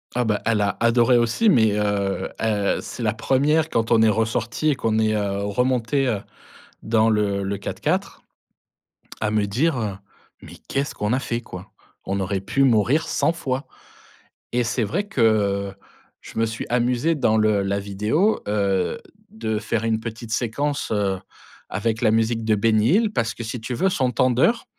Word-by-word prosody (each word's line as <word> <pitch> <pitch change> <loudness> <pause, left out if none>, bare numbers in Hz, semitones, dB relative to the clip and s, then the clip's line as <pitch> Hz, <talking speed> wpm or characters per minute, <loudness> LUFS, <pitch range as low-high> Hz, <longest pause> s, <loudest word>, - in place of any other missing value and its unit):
Ah 125 - +2
bah, 105 -2 0
elle 110 -2 +2
a 100 0 0
adoré 120 +1 +4
aussi 120 - +2
mais, 110 - +4
heu 100 -2 -1
heu, 105 -3 +1
c'est 120 - -7
la 110 -2 +1
1re, 145 +7 +1
quand 115 0 -1
on 115 -1 +5
est 110 - +5
ressorti 115 +6 0
et 145 - +2
qu'on 110 -3 0
est, 110 0 +2
heu, 100 -1 -1
remontés, 125 +5 0
heu, 110 -5 -1 0.6
dans 110 0 +2
le 100 -2 +1
le 100 +1 -2
4x4, - - -2 1.0
à 110 -1 0
me 105 -1 +1
dire, 130 +9 0
heu: 105 -4 -3 0.5
«Mais - - -12
qu'est-ce 140 +1 -2
qu'on 105 +3 -1
a 130 - +1
fait 120 -3 -3
quoi? 90 -5 -10 0.3
On 100 +1 -2
aurait 95 0 -2
pu 125 +8 +1
mourir 130 +6 +3
100 - - +1
fois» 135 -5 -3 0.9
et 125 0 +1
c'est 120 0 0
vrai 190 - -2
que, 205 - -4
heu, 100 -3 +2 0.5
je - - -9
me 115 - +2
suis 115 +1 -5
amusé 125 +6 +1
dans 110 -7 +2
le 110 -2 +2
la 100 +1 -1
vidéo, 105 - 0
heu, 100 -3 0 0.3
de 110 -1 -3
faire 115 +1 -2
une 110 -1 0
petite 115 0 -7
séquence, 140 +6 -1
heu, 100 -3 0 0.5
avec 110 +3 -2
la 110 - +3
musique 115 +1 +1
de 110 - +3
Benny 110 +1 +2
Hill 215 0 +2
parce 115 - -1
que 115 - -7
si 110 +1 -5
tu 120 +2 -4
veux 190 +10 +1
son 130 -7 0
tendeur, 130 - +2
115 Hz, 180 wpm, -22 LUFS, 105-125 Hz, 1.0 s, on